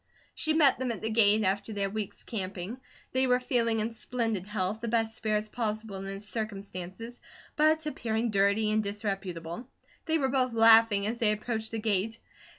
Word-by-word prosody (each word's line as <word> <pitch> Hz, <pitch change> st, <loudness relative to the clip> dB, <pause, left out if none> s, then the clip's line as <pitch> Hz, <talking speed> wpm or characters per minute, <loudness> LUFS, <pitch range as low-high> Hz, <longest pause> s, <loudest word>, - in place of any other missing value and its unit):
She 315 Hz, -, 0 dB
met 290 Hz, -6 st, +5 dB
them 260 Hz, -2 st, -1 dB
at 225 Hz, -, -6 dB
the 220 Hz, -, -1 dB
gate, 215 Hz, -1 st, +5 dB
after 200 Hz, +3 st, -1 dB
their 200 Hz, -1 st, -1 dB
week's 210 Hz, 0 st, -5 dB
camping. 195 Hz, +2 st, -5 dB, 0.3 s
They 260 Hz, 0 st, +2 dB
were 250 Hz, 0 st, +3 dB
feeling 230 Hz, -3 st, +1 dB
in 225 Hz, +2 st, -2 dB
splendid 225 Hz, -4 st, -2 dB
health, 210 Hz, +1 st, -2 dB
the 235 Hz, -, -3 dB
best 225 Hz, -1 st, 0 dB
spirits 215 Hz, -1 st, -1 dB
possible 215 Hz, -2 st, -3 dB
in 190 Hz, -, -6 dB
the 195 Hz, 0 st, -5 dB
circumstances, 205 Hz, +1 st, -5 dB, 0.3 s
but 310 Hz, 0 st, +3 dB
appearing 230 Hz, -5 st, -1 dB
dirty 200 Hz, +2 st, +2 dB
and 215 Hz, 0 st, +2 dB
disreputable. 195 Hz, -1 st, -4 dB, 0.4 s
They 320 Hz, 0 st, +2 dB
were 270 Hz, -4 st, 0 dB
both 255 Hz, -2 st, +1 dB
laughing 225 Hz, -2 st, +6 dB
as 230 Hz, +3 st, -2 dB
they 220 Hz, -2 st, +4 dB
approached 220 Hz, +1 st, -3 dB
the 225 Hz, -, -4 dB
gate. 215 Hz, 0 st, -1 dB
220 Hz, 175 wpm, -29 LUFS, 200-235 Hz, 0.4 s, laughing